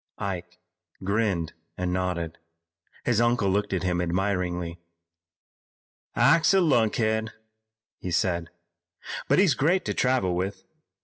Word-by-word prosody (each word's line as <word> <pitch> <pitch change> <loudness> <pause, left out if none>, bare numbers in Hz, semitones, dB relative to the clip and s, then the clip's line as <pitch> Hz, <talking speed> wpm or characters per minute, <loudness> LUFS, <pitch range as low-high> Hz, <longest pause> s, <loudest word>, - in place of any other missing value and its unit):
Ike 90 -3 -5 0.5
grinned 100 -5 0 0.2
and 90 0 -1
nodded. 90 -3 -2 0.7
His 120 -2 +2
uncle 120 -4 +2
looked 105 +1 0
at 95 -1 -1
him 90 -1 0
admiringly. 90 -1 -1 1.4
"Ike's 165 +3 +5
a - - +6
lunkhead," 110 - +2 0.7
he 90 - -5
said, 85 -2 0 0.8
"but - - +3
he's 190 -6 +5
great 165 +9 +1
to - - -1
travel 125 -8 +1
with. 95 +1 -3
95 Hz, 115 wpm, -26 LUFS, 90-115 Hz, 1.4 s, a